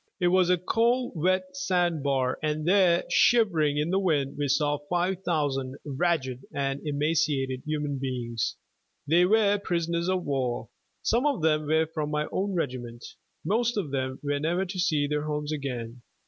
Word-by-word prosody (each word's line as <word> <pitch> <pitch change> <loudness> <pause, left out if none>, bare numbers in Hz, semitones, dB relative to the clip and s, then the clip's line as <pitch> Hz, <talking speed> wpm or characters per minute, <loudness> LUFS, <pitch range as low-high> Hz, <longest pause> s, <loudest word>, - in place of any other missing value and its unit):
It 175 -1 +3
was 185 0 +3
a 180 - +4
cold 235 +7 +1
wet 185 - 0
sandbar, 160 - 0
and 155 0 -1
there, 180 -2 +4
shivering 170 -12 +3
in 150 +3 0
the 190 - +2
wind, 150 -8 0
we 145 -1 -1
saw 145 +1 +1
five 180 +1 0
thousand 140 -6 -1
ragged 140 -3 -1
and 140 0 -2
emaciated 145 -3 0
human 150 -2 -2
beings. 120 -4 -2 0.5
They 170 +4 +5
were 205 0 +3
prisoners 170 0 -1
of 185 -1 0
war. 125 -4 -2 0.3
Some 240 +6 +2
of 275 - -1
them 155 -1 +2
were 160 +1 +3
from 155 -1 -4
my 150 0 -1
own 195 0 -1
regiment. 125 -7 -4 0.4
Most 235 +3 +1
of 170 -9 -2
them 130 -1 -2
were 145 0 -1
never 175 +5 0
to 185 0 -6
see 155 -5 +2
their 150 +1 -2
homes 150 0 -3
again. 125 -5 -5
155 Hz, 160 wpm, -27 LUFS, 140-180 Hz, 0.5 s, They